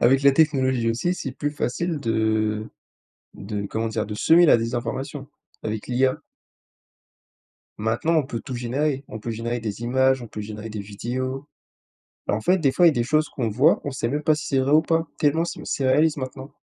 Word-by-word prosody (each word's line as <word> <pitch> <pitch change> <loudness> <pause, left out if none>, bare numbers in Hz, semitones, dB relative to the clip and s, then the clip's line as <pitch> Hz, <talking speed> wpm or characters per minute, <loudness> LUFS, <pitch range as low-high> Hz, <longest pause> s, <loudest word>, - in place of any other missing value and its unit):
avec 135 +3 +4
la 140 0 +6
technologie 130 -5 +2
aussi, 175 +11 0
c'est 135 -7 -5
plus 145 +3 -2
facile 155 +4 -2
de 110 -2 0 0.7
de, 100 0 -5
comment 110 +3 -2
dire, 110 -1 -2
de 105 - -5
semer 165 +11 +5
la - - +7
désinformation 130 +5 -4 0.3
avec 110 -1 -4
l'IA 130 +1 +1 1.6
maintenant, 115 +9 0
on 155 - +3
peut 120 -3 -5
tout 130 - -6
générer, 135 +4 -1
on 110 - -7
peut 115 +2 -4
générer 120 +2 -3
des 110 0 -5
images, 130 +2 +2
on 120 - -8
peut 105 - -7
générer 105 +1 -7
des 105 -1 -6
vidéos. 130 +7 -4 0.8
Bah, - - +1
en 110 - -3
fait, 180 - +3
des 140 -4 +3
fois, 175 - +4
il - - +9
y - - +2
a - - -3
des 120 - 0
choses 155 +5 +2
qu'on 120 -4 -2
voit, 135 +10 +4
qu'on 145 - -6
sait 120 -3 -2
même 145 +5 -1
pas 155 0 +4
si 150 - -6
c'est 135 -2 +1
vrai 135 +2 +1
ou 155 +1 +6
pas, 165 0 0
tellement 160 +3 +2
c'est - - -6
c'est 135 - -2
réaliste 150 +4 +3
maintenant. 130 +1 -7
130 Hz, 210 wpm, -24 LUFS, 115-145 Hz, 1.6 s, il